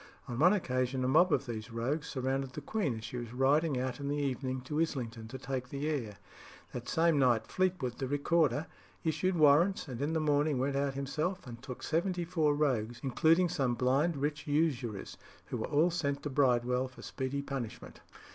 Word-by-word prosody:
On 120 0 -4
one 175 +5 +7
occasion 130 -8 0
a - - +1
mob 165 +7 +5
of - - +2
these 110 -1 -5
rogues 130 +7 -2
surrounded 135 0 -2
the 150 - -6
queen 145 - -1
as 110 - -9
she 120 +2 -5
was 120 -1 -6
riding 140 +2 +3
out 130 0 -3
in 140 - -4
the 145 +1 -1
evening 130 -2 -2
to 150 +5 -2
Islington 115 -8 -3
to 130 - -7
take 130 -1 -4
the 140 +2 -3
air. 120 -10 -2 0.6
That 120 0 -5
same 165 -2 +3
night 120 -4 +3
Fleetwood, 180 -10 -1
the 135 - -1
Recorder, 145 0 +2 0.4
issued 165 +4 0
warrants, 160 +5 +4
and 125 -2 -6
in 150 +3 0
the 160 - +1
morning 150 -1 +2
went 135 +2 0
out 140 -1 0
himself 155 +7 -2
and 120 -2 -9
took 130 -2 -8
seventy 175 +2 0
four 160 -4 +2
rogues, 120 -6 0
including 160 +6 +3
some 135 -8 0
blind 140 +6 +2
rich 150 +2 -2
usurers, 140 -9 -1 0.3
who - - -4
were - - -3
all 160 +5 +3
sent 140 -4 -1
to 145 - -3
Bridewell 125 -1 +2
for 130 - -14
speedy 135 +1 -3
punishment. 135 -5 -6
140 Hz, 195 wpm, -32 LUFS, 125-155 Hz, 0.6 s, one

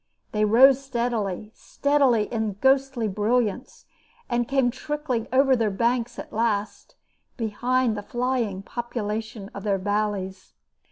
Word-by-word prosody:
They 215 0 +1
rose 260 +5 +6
steadily, 230 -6 -2
steadily 275 -7 +2
in 220 -1 0
the 205 - -3
ghostly 265 0 +2
brilliance, 215 +4 -1 0.5
and 240 0 +1
came 270 -3 +2
trickling 265 -3 -3
over 265 0 +4
their 225 -3 +1
banks 235 +3 0
at - - -8
last, 215 -2 -2 0.4
behind 240 +1 0
the 205 - -4
flying 240 -4 -2
population 220 -2 -5
of 200 - -7
their 200 -1 0
valleys. 200 -1 -2
230 Hz, 125 wpm, -25 LUFS, 210-255 Hz, 0.5 s, rose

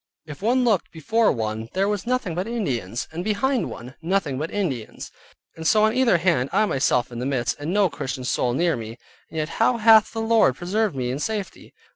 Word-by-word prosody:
If 150 +1 -10
one 245 +5 +2
looked 220 -7 +1
before 220 +8 +1
one 110 -1 -3
there 195 +1 +1
was 205 +1 -2
nothing 250 -8 -1
but 180 +5 -3
Indians, 125 - -3
and 165 +2 -5
behind 225 +5 0
one, 125 +2 -9
nothing 165 -6 -1
but 155 +3 -3
Indians, 140 - -4 0.4
and 160 0 -3
so 215 +3 +4
on 220 0 +3
either 250 -7 +3
hand, 165 -7 +1
I 215 +3 +3
myself 130 - +1
in 120 - -6
the 125 - -3
midst, 120 -4 -1
and 145 +4 -3
no 200 0 +3
Christian 135 -5 -5
soul 125 -1 0
near 170 +2 +2
me, 115 0 -7 0.3
and 160 - -8
yet 155 0 -1
how 235 +1 +4
hath 220 -1 +6
the 225 - -5
Lord 225 - +3
preserved 195 - -1
me 125 -2 -2
in 135 - -3
safety? 210 +3 -5
175 Hz, 210 wpm, -23 LUFS, 130-215 Hz, 0.4 s, hath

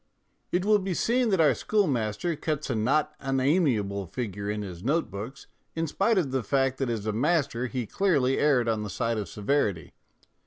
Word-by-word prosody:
It 180 +2 0
will 210 0 +5
be 190 -2 -3
seen 240 - +2
that 190 -4 +2
our 155 -2 +5
schoolmaster 150 - 0
cuts 150 -2 -3
a - - 0
not 140 +8 +1
unamiable 130 - +1
figure 100 -1 -4
in 105 0 -2
his 90 -3 -8
note 145 - 0
books, 110 +8 -7 0.3
in 165 0 0
spite 195 +8 +1
of 155 -8 +1
the 130 -1 0
fact 135 +3 0
that 135 -3 0
as 110 -3 -3
a 110 - -1
master 130 -1 +1
he 125 -1 -3
clearly 140 - +1
erred 135 -5 +3
on 110 -2 0
the 105 - -4
side 115 +5 -1
of 105 - -5
severity. 105 - -1
130 Hz, 190 wpm, -27 LUFS, 110-160 Hz, 0.3 s, will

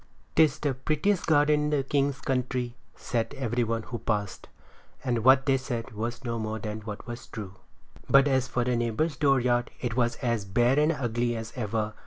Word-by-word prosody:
"'Tis 155 -2 +5
the 145 -3 -1
prettiest 155 +9 0
garden 150 -1 +4
in - - 0
the 145 -2 +1
king's 140 -1 0
country," 125 -2 -1 0.2
said 115 -2 -2
every 120 -2 0
one 115 0 -1
who 120 0 -6
passed; 105 -3 -2 0.6
and 120 -4 0
what 130 +1 +6
they 135 -2 +3
said 125 -2 -4
was 120 +4 -4
no 115 -1 -2
more 110 0 -3
than 105 0 -5
what 105 -1 -7
was 120 0 -8
true. 100 -5 -7 0.6
But 135 +1 +6
as 130 -2 +2
for 125 - 0
the 125 0 0
neighbor's 120 +7 0
dooryard 125 -4 +2
it 120 -2 -3
was 120 -1 +1
as 115 -4 -1
bare 120 +8 +2
and 150 +2 +4
ugly 120 -4 -1
as 115 0 -6
ever. 110 -2 -2
120 Hz, 190 wpm, -27 LUFS, 115-135 Hz, 0.6 s, what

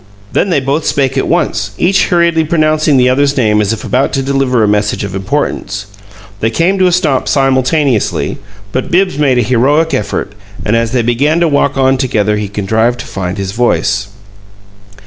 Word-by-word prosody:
Then - - 0
they 165 -5 +2
both 140 +4 -2
spoke 135 -2 0
at 135 - 0
once, 105 - -1
each 190 +3 +2
hurriedly 170 -2 +2
pronouncing 155 -2 +1
the 125 0 +4
other's 140 +2 +1
name 105 -4 +2
as 105 0 0
if 115 - -4
about 130 +2 0
to 135 - -1
deliver 135 -3 +1
a - - +2
message 105 0 0
of 100 -2 -5
importance. 100 -1 -3 0.5
Then 110 - +1
both 115 - -7
came 185 +4 +2
to 185 - +4
a - - +2
stop 160 -7 0
simultaneously, 135 -2 0 0.3
but 130 - -3
Bibbs 180 -3 +1
made 135 -4 +2
a 120 - +2
heroic 140 +8 +1
effort, 100 -1 -2 0.3
and 105 - +1
as 115 0 0
they 125 -2 +1
began 140 +8 +1
to 170 - +3
walk 140 -2 +1
on 135 0 +2
together 105 -5 0
he 105 -1 -3
contrived 110 +4 0
to - - -9
find 95 0 -5
his 95 -1 -3
voice. 100 -3 0
130 Hz, 190 wpm, -12 LUFS, 105-150 Hz, 0.5 s, the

